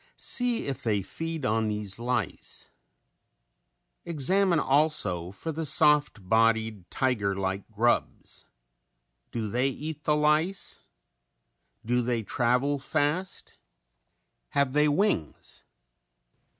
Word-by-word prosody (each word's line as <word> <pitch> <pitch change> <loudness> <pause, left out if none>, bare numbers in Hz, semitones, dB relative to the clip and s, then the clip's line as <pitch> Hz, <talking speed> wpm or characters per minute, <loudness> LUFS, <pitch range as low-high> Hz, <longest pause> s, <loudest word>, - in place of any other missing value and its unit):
See 245 -2 +2
if 135 -1 -4
they 105 -6 0
feed 165 - -5
on 110 -1 +1
these 105 -1 -3
lice. 120 -5 -4 1.3
Examine 170 +3 +2
also 135 - +1
for 100 +12 -5
the 160 +1 -4
soft 145 -9 +3
bodied, 110 -3 +1
tiger 115 -8 0
like 95 +1 -3
grubs. 115 +2 -1 0.9
Do 115 -2 -3
they 125 +6 0
eat 150 +2 -6
the 150 - +3
lice? 155 +5 +1 1.1
Do 125 +2 +1
they 120 -2 -1
travel 125 +6 +1
fast? 155 +7 -2 1.0
Have 140 -2 +1
they 150 +1 +4
wings? 145 - -1
130 Hz, 100 wpm, -27 LUFS, 110-150 Hz, 1.3 s, they